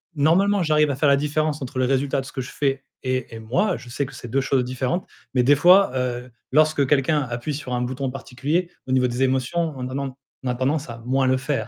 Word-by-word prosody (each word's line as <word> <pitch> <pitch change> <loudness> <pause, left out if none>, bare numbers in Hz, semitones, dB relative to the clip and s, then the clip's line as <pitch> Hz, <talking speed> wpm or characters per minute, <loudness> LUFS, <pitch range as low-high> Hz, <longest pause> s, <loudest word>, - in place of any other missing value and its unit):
normalement, 185 +7 +3
j'arrive 150 -3 +3
à - - -2
faire 145 +1 +2
la 140 - +5
différence 150 +1 -1
entre 130 +1 -5
le 130 - +3
résultat 135 +1 +1
de - - -11
ce - - -10
que 130 - -4
je 125 - -8
fais 135 -1 -1 0.2
et 130 -2 -2
et - - -7
moi, 135 - 0
je 120 - -12
sais 140 +3 -2
que - - -11
c'est 120 - -9
2 135 +4 +1
choses 135 -1 +1
différentes 130 +7 -2 0.3
mais 125 - +3
des 145 +4 +5
fois, 180 +3 +6
heu, 125 -1 -3 0.2
lorsque 155 -1 +4
quelqu'un 145 +2 +2
appuie 120 +4 -4
sur 135 -4 -5
un 125 - 0
bouton 130 +1 -2
particulier 145 +7 -2 0.2
au - - -4
niveau 130 -1 +3
des 125 +2 -1
émotions, 135 +5 0
on 125 -1 -5
a - - -6
nen 140 -1 -2 0.3
on - - -4
a 125 - 0
tendance 140 +3 -1
à 115 - -7
moins 130 +1 +2
le 130 0 +3
faire, 130 -4 -2
135 Hz, 250 wpm, -23 LUFS, 125-150 Hz, 0.3 s, fois